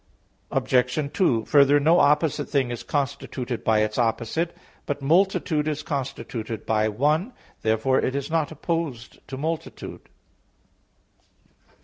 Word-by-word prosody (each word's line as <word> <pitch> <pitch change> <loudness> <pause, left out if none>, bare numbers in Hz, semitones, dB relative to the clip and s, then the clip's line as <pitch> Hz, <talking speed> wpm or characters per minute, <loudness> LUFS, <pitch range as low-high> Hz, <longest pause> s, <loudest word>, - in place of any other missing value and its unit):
Obj. 130 +3 +1
2: 120 - +2
Further, 145 0 +5
no 165 +5 +4
opposite 150 0 +2
thing 135 -4 +1
is 120 - -4
constituted 130 -3 -3
by 110 -1 +3
its 110 +2 -1
opposite. 120 +8 -1 0.3
But 145 -1 -3
multitude 160 -1 +2
is 155 0 -2
constituted 125 -5 -4
by 110 -1 +2
one. 150 - +1 0.3
Therefore 110 +4 +2
it 130 - -1
is 140 +2 -3
not 160 -3 +1
opposed 155 -6 -4
to 130 - -6
"multitude." 160 +3 -5
140 Hz, 120 wpm, -24 LUFS, 120-155 Hz, 0.3 s, Further